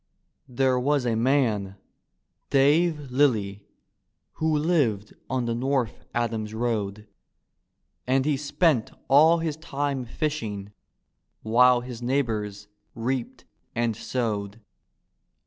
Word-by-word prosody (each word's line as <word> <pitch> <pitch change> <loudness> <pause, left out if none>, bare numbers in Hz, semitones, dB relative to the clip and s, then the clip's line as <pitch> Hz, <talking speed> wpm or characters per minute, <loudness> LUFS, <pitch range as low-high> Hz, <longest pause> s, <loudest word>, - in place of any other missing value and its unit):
There 130 0 +2
was 140 0 +1
a 120 - +1
man, 115 -6 +1 0.7
Dave 145 +1 +2
Lilly, 110 -8 +1 0.8
who 160 -1 +1
lived 145 - +1 0.2
on 130 -1 -1
the 115 - -1
North 125 -1 -1
Adams 110 -2 -2
road. 105 -3 -2 1.0
And 130 +1 +2
he 150 -1 +2
spent 145 -2 +1 0.2
all 155 +5 +6
his 160 -2 -2
time 140 -4 -3
fishing, 110 -7 -4 0.7
while 125 +2 +5
his 120 -1 -8
nei^bors 110 -6 -1 0.3
reaped 120 +1 -3 0.3
and 115 -1 0
sowed. 105 -3 -3
125 Hz, 100 wpm, -25 LUFS, 110-140 Hz, 1.0 s, all